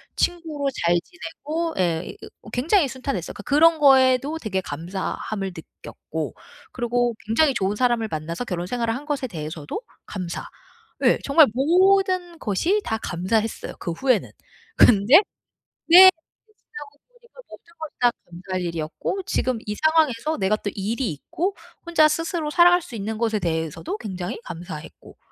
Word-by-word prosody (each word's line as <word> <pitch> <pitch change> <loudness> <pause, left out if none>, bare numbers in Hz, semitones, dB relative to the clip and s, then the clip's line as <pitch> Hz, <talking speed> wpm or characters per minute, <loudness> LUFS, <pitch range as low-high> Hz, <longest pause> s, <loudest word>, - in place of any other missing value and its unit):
친구로 315 -5 -1 0.2
잘 170 +1 +4
지내고 290 - -5
예. 170 -2 -1 0.3
어 - - -13
굉장히 295 - +2
순탄했어요. 255 - -4
그러니까 - - -10
그런 315 +2 +4
거에도 270 +1 +4
되게 195 -8 -2
감사함을 190 +5 -4
느꼈고 - - -7 0.4
그러고 240 0 0
굉장히 265 +6 +3
좋은 195 -3 -1
사람을 240 -1 +1
만나서 165 +8 -4
결혼 180 -5 -3
생활을 230 0 -1
한 280 +4 -7
것에 285 -3 -2
대해서도 155 - -6 0.2
감사. 180 -4 -5 0.6
예. - - +5
정말 285 +1 +6
모든 365 +4 +2
것이 335 - 0
다 220 - -2
감사했어요 210 +6 -2
그 170 - -4
후에는. 250 +5 +1 0.5
근데 220 +5 +6 0.7
네 365 +3 +10
이게 375 +5 -2
지나고 290 -1 -11 0.2
보니까 - - -19
모든 - - -14
걸 315 -1 -6
다 245 -1 +4
감사할 185 +2 -6
일이었고 170 - -4
지금 255 -10 -1
이 210 - -3
상황에서 315 -1 +1
내가 195 +2 +1
또 205 - -4
일이 220 +3 -2
있고 350 - -3 0.3
혼자 335 -2 +4
스스로 325 0 -2
살아갈 350 +2 +5
수 245 - -10
있는 215 +1 -4
것에 220 -1 0
대해서도 165 0 -3
굉장히 185 -5 -5
감사했고. 170 -2 -10
240 Hz, 330 characters per minute, -23 LUFS, 190-315 Hz, 0.7 s, 네